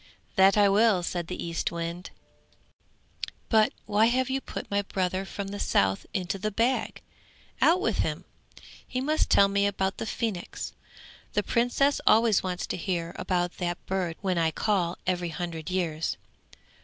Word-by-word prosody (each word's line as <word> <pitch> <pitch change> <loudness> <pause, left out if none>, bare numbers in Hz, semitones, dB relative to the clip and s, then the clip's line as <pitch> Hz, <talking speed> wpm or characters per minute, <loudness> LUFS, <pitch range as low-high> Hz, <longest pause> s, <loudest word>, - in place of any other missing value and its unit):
'That 190 +2 +6
I 205 -1 +6
will,' 200 -2 +4
said 175 -1 -3
the 180 - -5
Eastwind, 170 +1 -3 1.4
'But 220 -2 +4
why 215 +2 +4
have 260 +2 +1
you 270 0 0
put - - -7
my 200 0 +2
brother 190 -1 -2
from 195 0 -5
the 205 +1 -6
south 95 0 +1
into 190 -1 -2
the 215 - -1
bag? 230 +5 0 0.6
Out 345 +3 +5
with - - 0
him. - - -1 0.6
He 255 - -2
must 305 +4 +1
tell 200 - +6
me 200 0 +2
about 195 -1 -1
the 225 - -3
phoenix; 215 -6 -3 0.6
the - - +1
Princess 245 +4 +2
always 225 -2 +5
wants 180 -1 -3
to - - -3
hear 170 -2 -2
about 175 -1 -1
that 175 -1 -2
bird 185 -3 -1
when 185 -3 0
I 165 -1 +3
call 180 -1 0
every 180 -2 0
hundred 165 -1 -5
years. 165 -4 -1
190 Hz, 155 wpm, -27 LUFS, 175-215 Hz, 1.4 s, That